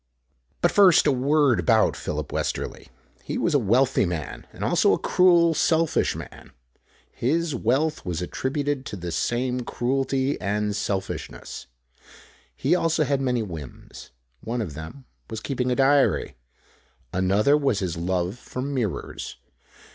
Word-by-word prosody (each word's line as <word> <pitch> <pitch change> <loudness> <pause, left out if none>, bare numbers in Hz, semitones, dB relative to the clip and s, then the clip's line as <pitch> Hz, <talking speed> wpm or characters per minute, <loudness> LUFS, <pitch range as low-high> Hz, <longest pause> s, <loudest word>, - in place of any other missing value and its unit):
But 175 - +3
first 195 -5 +6
a 150 - +4
word 135 -3 +3
about 85 - +3
Philip - - -4
Westerly. - - -3 0.4
He - - -4
was - - 0
a 145 - +4
wealthy 125 +4 +3
man, 85 -5 -5
and - - -8
also - - +3
a - - +2
cruel, 175 -2 +4
selfish 160 +1 +2
man. - - -10 0.6
His 160 +5 0
wealth 135 +6 0
was 90 -4 -3
attributed 140 - -2
to - - -5
this 85 -3 -5
same 125 +1 -1
cruelty 135 +3 -1
and 105 +1 -1
selfishness. 95 -10 -4 0.9
He 145 - +1
also 165 -3 +2
had 140 -1 0
many 125 -3 0
whims. 80 - -9 0.3
One 120 - -4
of 95 -10 -4
them 80 - -9 0.2
was 110 -2 -4
keeping 125 +1 -2
a - - +2
diary. 135 - +3 0.8
Another 100 +9 +3
was 140 -7 +1
his 90 -4 -2
love 90 +5 -2
for 125 - -6
mirrors. 130 -8 -3
125 Hz, 140 wpm, -24 LUFS, 100-145 Hz, 0.9 s, first